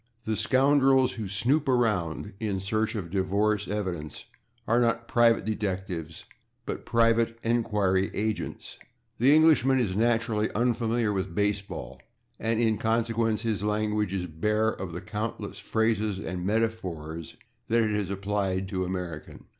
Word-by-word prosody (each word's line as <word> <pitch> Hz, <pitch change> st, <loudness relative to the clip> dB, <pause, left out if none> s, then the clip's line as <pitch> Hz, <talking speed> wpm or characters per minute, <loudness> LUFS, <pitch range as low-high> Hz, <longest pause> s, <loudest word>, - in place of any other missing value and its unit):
The 110 Hz, -, 0 dB
scoundrels 135 Hz, +1 st, +4 dB
who 110 Hz, -4 st, -5 dB
snoop 130 Hz, +10 st, +1 dB
around 105 Hz, -6 st, 0 dB
in 105 Hz, -4 st, -1 dB
search 110 Hz, +4 st, -1 dB
of 90 Hz, -6 st, -5 dB
divorce 100 Hz, +2 st, +1 dB
evidence 90 Hz, -7 st, -4 dB, 0.4 s
are 120 Hz, +2 st, +3 dB
not 115 Hz, 0 st, +1 dB
/private 115 Hz, -1 st, +3 dB
detectives/, 95 Hz, -6 st, -4 dB, 0.4 s
but -, -, -5 dB
/private 115 Hz, 0 st, +3 dB
enquiry 105 Hz, -5 st, +1 dB
agents/. 110 Hz, +1 st, -3 dB
[Pg111] -, -, -21 dB, 0.3 s
The 135 Hz, +5 st, +6 dB
Englishman 150 Hz, -4 st, +5 dB
is 100 Hz, -7 st, 0 dB
naturally 115 Hz, -1 st, +1 dB
unfamiliar 115 Hz, -1 st, +1 dB
with 95 Hz, -3 st, -3 dB
baseball, 105 Hz, -1 st, -2 dB, 0.4 s
and 115 Hz, 0 st, 0 dB
in 110 Hz, -3 st, +2 dB
consequence 115 Hz, 0 st, 0 dB
his 110 Hz, -4 st, -1 dB
language 105 Hz, -1 st, 0 dB
is 95 Hz, -2 st, -2 dB
bare 105 Hz, +7 st, 0 dB
of 95 Hz, -5 st, -5 dB
the 85 Hz, +1 st, -6 dB
countless 110 Hz, +2 st, -5 dB
phrases 110 Hz, -2 st, 0 dB
and 90 Hz, -1 st, -4 dB
metaphors 90 Hz, -8 st, -2 dB, 0.3 s
that 115 Hz, 0 st, +3 dB
it 105 Hz, -1 st, 0 dB
has 105 Hz, -2 st, -1 dB
supplied 100 Hz, -1 st, -1 dB
to 95 Hz, -2 st, -1 dB
American. 90 Hz, -4 st, -6 dB
105 Hz, 140 wpm, -27 LUFS, 95-115 Hz, 0.4 s, The